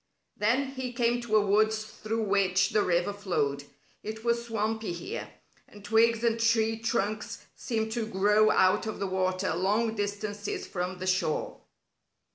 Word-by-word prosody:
Then 245 +5 +1
he 260 -2 -5
came 240 0 +1
to 230 -2 -1
a 210 -1 +4
woods 215 +2 +2
through 220 +1 -4
which 190 -2 +2
the 215 - +3
river 175 +1 +1
flowed. 150 -8 -1 0.4
It 220 +1 -6
was 235 0 +1
swampy 220 -3 -2
here, 170 0 -6 0.4
and 205 -1 -14
twigs 230 +1 +3
and 230 -1 +2
tree 225 -1 +2
trunks 225 0 -2
seemed 220 -2 -2
to 225 -1 -2
grow 210 +1 +3
out 185 +3 +3
of 215 - -4
the 200 - -1
water 185 -1 0
long 210 +6 +1
distances 205 0 -3
from 180 0 -4
the 185 - -5
shore. 185 -4 -1
215 Hz, 155 wpm, -28 LUFS, 190-225 Hz, 0.4 s, a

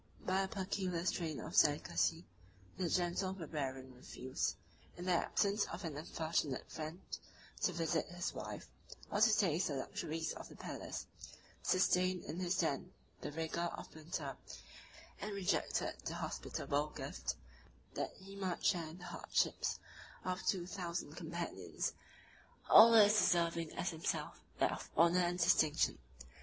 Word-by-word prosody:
By 190 +1 +2
a 195 - 0
peculiar 190 -3 -2
strain 165 -5 -1
of 160 - -6
delicacy, 160 +3 +3 0.5
the 180 -2 -1
Gentle 180 +2 +1
Barbarian 135 -7 -4
refused, 130 +1 -3 0.4
in 175 - -6
the 185 - +2
absence 200 +4 +2
of 170 +3 -6
an 160 -4 -3
unfortunate 155 -2 -1
friend, 160 +2 -5 0.6
to - - +3
visit 165 -1 0
his 175 +1 -3
wife, - - -6 0.5
or 205 - +1
to 220 -1 +6
taste 175 -3 +3
the 145 - -2
luxuries 160 +4 -3
of - - -9
the - - -12
palace; - - -5 0.6
sustained 185 -1 +3
in 160 +4 -5
his 185 0 0
tent 160 +2 0 0.3
the - - -4
rigor 160 +2 -2
of - - -9
the 155 - -11
winter; 155 +2 -4 0.9
and 205 0 -3
rejected 195 -2 0
the - - -3
hospitable 145 +2 -2
gift, - - -3 0.6
that - - -2
he 195 +1 -11
might 190 -3 -2
share 165 -4 +2
the 180 +1 -11
hardships - - 0 0.5
of 185 0 -1
two 180 -3 +2
thousand 175 -4 -4
companions, 170 0 -3 0.8
all 230 +1 +11
as 210 -1 +8
deserving 170 -4 +3
as 180 - -1
himself 160 -1 -2 0.2
of - - -24
that - - +1
honor 170 +3 +6
and 175 0 +1
distinction. 160 - +3
175 Hz, 145 wpm, -37 LUFS, 160-185 Hz, 0.9 s, all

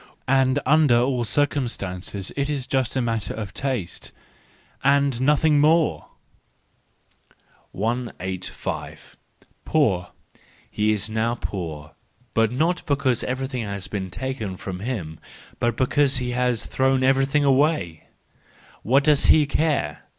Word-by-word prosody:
And 135 0 +3
under 145 -4 +4
all 125 0 +1
circumstances 105 -9 -2
it 140 0 -1
is 140 -4 -2
just 130 -3 -1
a 130 - +1
matter 115 -3 -2
of 105 -4 -6
taste—and 135 +3 -3
nothing 150 +2 +3
more! 155 +2 +2 1.6
185. 100 -4 -4 0.5
Poor 105 - +1 0.6
.—He 105 +1 +1
is 105 -1 -1
now 110 +2 -1
poor, 80 -9 -6 0.4
but 115 -1 +2
not 165 +8 0
because 135 -4 +1
every¬ 130 +1 -2
thing 130 -3 -4
has 100 -3 -5
been 95 -3 -4
taken 110 -3 -4
from 90 -1 -6
him, 95 -9 -5 0.4
but 120 -1 0
because 140 +1 +2
he 125 -1 -2
has 125 -2 0
thrown 130 0 +1
everything 135 +2 +3
away:—what 135 - -1
does 150 -1 +4
he 155 -2 +6
care 145 - -1
125 Hz, 115 wpm, -23 LUFS, 105-140 Hz, 1.6 s, he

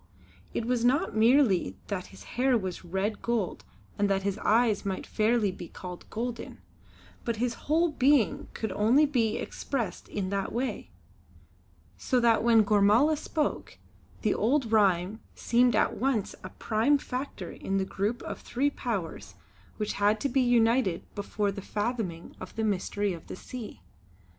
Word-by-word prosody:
It 230 - -2
was 245 -1 0
not 275 +8 +2
merely 220 - +4
that 185 -3 -4
his 95 +1 -14
hair 250 - +1
was 185 -4 -5
red 190 +5 -2
gold 230 -6 -1 0.4
and 205 0 +2
that 195 -1 +1
his 200 +1 -1
eyes 220 -1 +3
might 195 -2 -3
fairly 215 -2 +1
be 175 -2 -9
called 180 0 -9
golden, 235 +1 -5 0.7
but 235 - -1
his 235 +2 -1 0.2
whole 330 +2 +3
being 275 -5 +2
could 220 -3 -3
only 230 +10 +4
be 235 -6 +1
expressed 230 -10 -4
in 195 -2 -3
that 200 -1 -1
way; 240 - -3 1.1
so 255 - +1
that 230 -2 +3
when 230 -2 +6
Gormala 210 +9 +4
spoke, 300 0 -3 0.5
the - - +3
old 245 0 +1
rhyme 200 -1 +3 0.2
seemed 240 0 +3
at - - +2
once 250 -5 0
a - - -6
prime 230 +7 +1
factor 255 -9 -5
in 195 - -3
the 190 - 0
group 205 +5 -2
of - - -6
three 280 +4 0
powers 205 - -4 0.4
which 210 -1 -2
had 210 +1 +3
to 280 - 0
be 265 +1 +2
united 235 -5 +3
before 205 0 -1
the 200 0 -7
fathoming 205 -5 -3
of - - -9
the 225 - -1
Mystery 205 -1 0
of 165 - -10
the - - -6
Sea. 215 - -9
220 Hz, 160 wpm, -28 LUFS, 200-245 Hz, 1.1 s, when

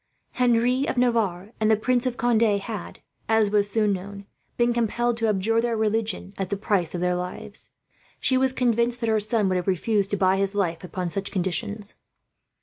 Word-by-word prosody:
Henry 250 +2 +2
of - - -2
Navarre 220 -6 +1
and 215 0 +2
the 220 - +4
Prince 250 +3 +1
of 245 -1 -3
Conde 235 -1 +2
had, 210 -2 -1 0.3
as 220 -2 +3
was 205 -1 +2
soon 210 -1 +2
known, 200 +1 -7 0.3
been 240 0 +3
compelled 240 +1 0
to 230 -1 0
abjure 215 +2 +2
their 235 -1 -1
religion 215 -3 -1
as 195 - -1
the 200 - -2
price 190 -5 0
of 175 - -3
their 180 0 +1
lives. 180 0 -5 0.5
She 260 - +1
was 260 0 +2
convinced 240 -1 +1
that 230 - 0
her 220 -1 +3
son 215 -1 +1
would 185 - +1
have 180 - -3
refused 195 +2 +1
to 205 - 0
buy 190 0 +3
his 195 +1 0
life, 175 -4 -1
upon 180 0 -4
such 195 +3 -2
conditions. 205 +3 -2
215 Hz, 195 wpm, -25 LUFS, 195-235 Hz, 0.5 s, the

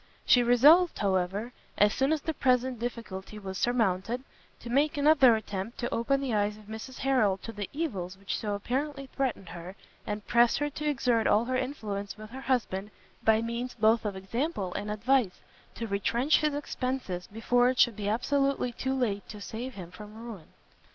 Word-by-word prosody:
She 245 - +6
resolved, 290 +9 +6
however, 195 +4 -1 0.2
as 210 +1 +4
soon 270 +2 +1
as 315 -2 +1
the 320 - -2
present 255 -3 +1
difficulty 215 -4 -5
was 190 -2 -6
surmounted, 230 0 0 0.4
to 235 - -8
make 290 +4 +2
another 285 -5 +6
attempt 210 0 -5
to 240 - -3
open 275 +4 +1
the 265 -4 -2
eyes 210 0 +1
of 215 - -14
Mrs 220 +5 -8
Harrel 245 -8 +2
to 230 - -8
the 205 -3 -5
evils 195 - -3
which 195 0 -4
so 210 -2 -2
apparently 275 +7 -3
threatened 245 -9 -2
her, 175 +2 -8 0.3
and 210 0 -4
press 235 0 +4
her 290 0 -1
to 300 +1 -2
exert 240 -5 +1
all 215 +3 +4
her 255 +1 -1
influence 215 -7 -3
with 215 0 -10
her 265 +2 -7
husband, 230 -6 -1 0.3
by 220 0 +4
means 235 +2 -4
both 220 +1 +3
of 205 -3 -3
example 195 - -3
and 205 - -4
advice, 220 -1 +1 0.4
to 230 - -4
retrench 230 +7 +2
his 300 -1 0
expences 255 -10 -3
before 245 +3 +2
it 255 - -1
should 235 -4 +4
be 205 0 -2
absolutely 275 +3 +1
too 265 +3 -2
late 215 -6 -1
to 210 - -8
save 235 +5 -6
him 175 -3 -8
from 210 +2 -11
ruin. 225 -7 -9
230 Hz, 185 wpm, -29 LUFS, 205-260 Hz, 0.4 s, She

